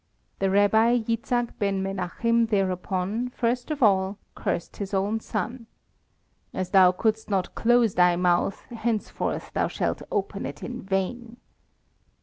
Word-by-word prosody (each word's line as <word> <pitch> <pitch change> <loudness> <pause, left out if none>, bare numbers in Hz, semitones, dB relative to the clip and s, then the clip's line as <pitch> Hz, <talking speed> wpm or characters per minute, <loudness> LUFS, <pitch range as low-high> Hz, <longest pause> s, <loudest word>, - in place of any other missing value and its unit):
The 195 - +1
Rabbi 220 +4 +4
Jitzchak 235 +1 -1
Ben 195 -2 0
Menachim 210 +5 0
thereupon, 195 +3 -1
first 245 +1 -1
of 300 -4 -1
all, 195 -1 +3 0.2
cursed 170 - -3
his 200 0 -3
own 205 +3 0
son: 230 +2 -4 0.9
"As 185 -1 -3
thou 185 -2 +7
couldst 220 +4 -1
not 190 -3 -1
close 235 -3 +3
thy 180 -1 +4
mouth, 175 +2 +1
henceforth 230 -2 -2
thou - - +1
shalt - - -2
open - - -2
it - - -9
in 245 0 -5
vain." 225 +5 -3
210 Hz, 135 wpm, -26 LUFS, 190-235 Hz, 0.9 s, thou